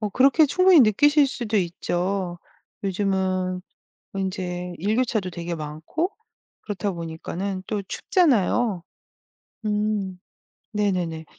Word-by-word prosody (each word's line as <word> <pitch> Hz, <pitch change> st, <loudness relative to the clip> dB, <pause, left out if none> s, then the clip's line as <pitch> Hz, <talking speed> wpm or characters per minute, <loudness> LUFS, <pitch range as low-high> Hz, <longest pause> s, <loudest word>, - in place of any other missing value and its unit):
어 210 Hz, -, -1 dB
그렇게 275 Hz, -, +5 dB
충분히 365 Hz, +2 st, +6 dB
느끼실 290 Hz, +6 st, +5 dB
수도 235 Hz, -5 st, -2 dB
있죠. 180 Hz, 0 st, -1 dB, 0.4 s
요즘은 185 Hz, -1 st, 0 dB, 0.5 s
인제 180 Hz, -2 st, -3 dB
일교차도 215 Hz, 0 st, 0 dB
되게 170 Hz, 0 st, -4 dB
많고 160 Hz, -, -3 dB, 0.5 s
그렇다 200 Hz, -1 st, -2 dB
보니까는 175 Hz, +3 st, -4 dB
또 210 Hz, -2 st, -2 dB
춥잖아요. 235 Hz, -, +2 dB, 0.8 s
음. 210 Hz, -3 st, -1 dB, 0.6 s
네네네. 180 Hz, -6 st, -1 dB
195 Hz, 225 characters per minute, -24 LUFS, 180-220 Hz, 0.8 s, 충분히